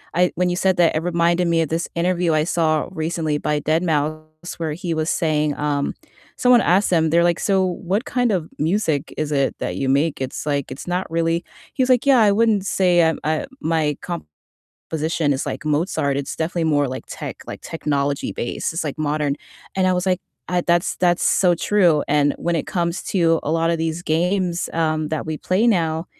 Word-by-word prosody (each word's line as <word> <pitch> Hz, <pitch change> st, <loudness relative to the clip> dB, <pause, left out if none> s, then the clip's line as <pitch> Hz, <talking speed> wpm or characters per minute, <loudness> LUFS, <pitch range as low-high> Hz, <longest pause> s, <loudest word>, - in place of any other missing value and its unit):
I 180 Hz, 0 st, +3 dB
when 180 Hz, 0 st, +1 dB
you 175 Hz, -, -1 dB
said 190 Hz, 0 st, +1 dB
that 170 Hz, -3 st, +3 dB
it 155 Hz, -, +2 dB
reminded 170 Hz, 0 st, +1 dB
me 165 Hz, -1 st, +2 dB
of 160 Hz, -, -1 dB
this 165 Hz, +2 st, -1 dB
interview 175 Hz, -1 st, +1 dB
I 155 Hz, -1 st, +2 dB
saw 160 Hz, -3 st, +1 dB
recently 160 Hz, -3 st, -2 dB
by 150 Hz, 0 st, -1 dB
deadmau5 155 Hz, +1 st, -2 dB
where 160 Hz, -2 st, -2 dB
he 170 Hz, +1 st, -3 dB
was 160 Hz, 0 st, -1 dB
saying, 150 Hz, -2 st, +1 dB
um, 145 Hz, -1 st, -1 dB, 0.4 s
someone 250 Hz, -1 st, +5 dB
asked 190 Hz, +4 st, +3 dB
him, 160 Hz, -2 st, +3 dB
they're 170 Hz, +2 st, +4 dB
like, 175 Hz, 0 st, +2 dB
"So 195 Hz, -2 st, +2 dB
what 185 Hz, -, -2 dB
kind 250 Hz, -5 st, 0 dB
of 175 Hz, -5 st, -1 dB
music 160 Hz, -3 st, 0 dB
is 155 Hz, -1 st, -2 dB
it 140 Hz, -2 st, +1 dB
that -, -, -3 dB
you 135 Hz, -, -2 dB
make? 145 Hz, +3 st, +1 dB
It's 130 Hz, +2 st, -4 dB
like 140 Hz, -3 st, -1 dB
it's 130 Hz, -, -8 dB
not 180 Hz, +1 st, -2 dB
really" 165 Hz, +1 st, 0 dB, 0.3 s
He 260 Hz, -, +1 dB
was 255 Hz, -, -1 dB
like, 250 Hz, 0 st, +3 dB
"Yeah, 270 Hz, -3 st, +6 dB
I 210 Hz, -2 st, +5 dB
wouldn't 210 Hz, -2 st, +2 dB
say, 180 Hz, -3 st, +3 dB
uh, 160 Hz, -1 st, +3 dB
uh, 155 Hz, +1 st, 0 dB, 0.2 s
my 160 Hz, -, 0 dB, 0.7 s
composition 160 Hz, -1 st, -2 dB
is 135 Hz, -, -2 dB
like 140 Hz, -, -4 dB
Mozart. 150 Hz, -2 st, 0 dB
It's 140 Hz, 0 st, -3 dB
definitely 165 Hz, +1 st, -1 dB
more 145 Hz, -3 st, +2 dB
like 130 Hz, +1 st, -6 dB
tech, -, -, -6 dB
like -, -, -7 dB
technology 145 Hz, -3 st, -2 dB
based. 120 Hz, -, -3 dB
It's 165 Hz, 0 st, -3 dB
like 150 Hz, 0 st, -4 dB
modern." 150 Hz, -1 st, 0 dB, 0.4 s
And 190 Hz, -1 st, +2 dB
I 185 Hz, -, +3 dB
was 180 Hz, +1 st, -1 dB
like, 185 Hz, -1 st, +1 dB, 0.3 s
I 180 Hz, 0 st, +1 dB
that's 170 Hz, 0 st, +1 dB
that's 175 Hz, -1 st, +2 dB
so 180 Hz, -2 st, +4 dB
true, 175 Hz, -5 st, +3 dB
and 145 Hz, 0 st, +2 dB
when 170 Hz, 0 st, -1 dB
it 155 Hz, -, -2 dB
comes 170 Hz, 0 st, -1 dB
to 165 Hz, -4 st, +2 dB
a -, -, -2 dB
lot 165 Hz, +1 st, +1 dB
of 170 Hz, -, 0 dB
these 165 Hz, +1 st, -2 dB
games, 175 Hz, +2 st, 0 dB
um, 155 Hz, -1 st, 0 dB
that 155 Hz, 0 st, -3 dB
we 155 Hz, -1 st, -3 dB
play 190 Hz, +6 st, +1 dB
now, 165 Hz, -6 st, +1 dB
165 Hz, 205 wpm, -21 LUFS, 155-180 Hz, 0.7 s, Yeah